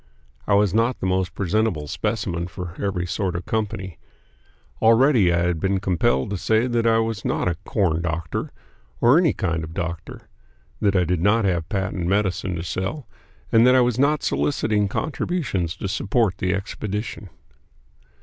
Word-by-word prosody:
I 100 - +4
was 100 -2 +3
not 115 +3 +1
the - - -3
most 95 0 0
presentable 100 -4 0
specimen 95 -2 -2
for 90 -1 -7
every 95 -3 -1
sort 90 0 -2
of 85 - -4
company. 100 -5 -3 0.8
Already 115 -3 +5
I 85 0 +2
had 90 -2 0
been 95 +2 0
compelled 90 -6 +1
to 100 - -2
say 110 +4 +2
that 120 -2 +1
I 115 0 +4
was 115 -2 -1
not - - -1
a 90 - +2
"corn 85 -6 +1
doctor" 85 -1 -3 0.5
or 125 +7 +5
any 170 -4 +3
kind 85 -3 -2
of 80 +1 -8
doctor; 85 -2 -5 0.5
that 100 -1 +2
I 90 - +4
did 90 -1 -1
not 105 +3 +3
have 85 -4 0
patent 95 -4 -2
medicine 95 -2 0
to 85 - -4
sell; 95 - -4 0.4
and 115 0 +6
that 125 - +6
I 130 - +6
was 120 0 +1
not 145 +2 +2
soliciting 105 -7 +1
contributions 135 - -2
to - - -4
support 100 0 0
the 90 - 0
expedition. 105 +1 -4
100 Hz, 170 wpm, -23 LUFS, 90-115 Hz, 0.8 s, and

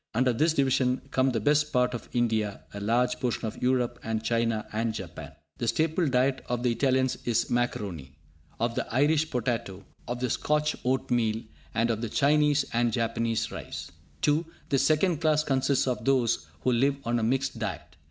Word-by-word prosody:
Under 125 +1 +3
this 155 +7 +2
division 130 -2 +2
come 130 +1 +3
the 120 -3 0
best 150 +6 +2
part 125 0 +2
of 120 - -6
India, 110 -4 0
a 100 - -5
large 120 +4 +1
portion 120 -2 -1
of 110 - -5
Europe, 125 -1 +1
and 110 0 -2
China 115 -2 0
and 110 0 -1
Japan. 95 -6 -7 0.3
The 120 - -1
staple 160 +6 +1
diet 130 0 +2
of 120 0 -1
the 125 - +3
Italians 130 +1 +1
is 115 -1 0
macaroni, 95 - -2 0.4
of 115 +1 0
the - - -3
Irish 150 +5 +2
potato, 115 -6 -2 0.2
of 120 0 -3
the 125 -2 -1
Scotch 150 0 +1
oatmeal, 120 -3 0 0.3
and 115 +1 +2
of 110 -1 -2
the 115 - -3
Chinese 145 +2 +3
and 120 0 +2
Japanese 115 0 -1
rice. - - -7 0.3
(2) 150 +2 +3 0.3
The 135 - +2
second 155 +4 +2
class 155 -1 +3
consists 135 -1 +1
of 125 - -1
those 120 - +1
who 130 - +2
live 135 +4 +3
on 120 0 +1
a - - -1
mixed 130 +1 0
diet. 100 -8 -5
125 Hz, 180 wpm, -28 LUFS, 115-135 Hz, 0.4 s, Under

